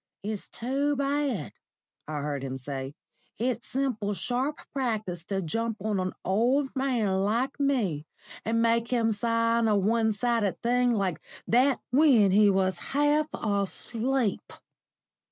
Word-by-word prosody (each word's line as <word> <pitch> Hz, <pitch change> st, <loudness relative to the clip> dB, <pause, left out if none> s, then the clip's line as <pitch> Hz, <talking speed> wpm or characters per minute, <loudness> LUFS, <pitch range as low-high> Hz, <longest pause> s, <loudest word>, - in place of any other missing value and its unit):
"It's 210 Hz, 0 st, -4 dB
too 275 Hz, +4 st, -1 dB
bad," 280 Hz, -, -1 dB, 0.5 s
I 150 Hz, -1 st, -3 dB
heard 145 Hz, -1 st, -3 dB
him 130 Hz, -1 st, -4 dB
say. 135 Hz, +1 st, -6 dB, 0.4 s
"It's 240 Hz, +1 st, -2 dB
simple 240 Hz, -6 st, -1 dB
sharp 255 Hz, -, -2 dB
practice 215 Hz, -, -2 dB
to 195 Hz, 0 st, -2 dB
jump 225 Hz, +6 st, -2 dB
on 205 Hz, 0 st, -1 dB
an 185 Hz, 0 st, -2 dB
old 250 Hz, +9 st, +1 dB
man 240 Hz, -8 st, +1 dB
like 235 Hz, +8 st, 0 dB
me, 210 Hz, -, 0 dB, 0.4 s
and 230 Hz, +1 st, +1 dB
make 230 Hz, 0 st, +2 dB
him 230 Hz, -2 st, +1 dB
sign 230 Hz, +1 st, +1 dB
a 215 Hz, -, +3 dB
one 220 Hz, +3 st, +2 dB
sided 220 Hz, -2 st, 0 dB
thing 245 Hz, +1 st, +3 dB
like 195 Hz, -7 st, -1 dB, 0.2 s
that 255 Hz, +3 st, +3 dB
when 250 Hz, -8 st, +5 dB
he 205 Hz, +1 st, +6 dB
was 190 Hz, -1 st, +1 dB
half 295 Hz, +2 st, +1 dB
asleep!" 220 Hz, +3 st, -1 dB
230 Hz, 135 wpm, -27 LUFS, 195-255 Hz, 0.5 s, he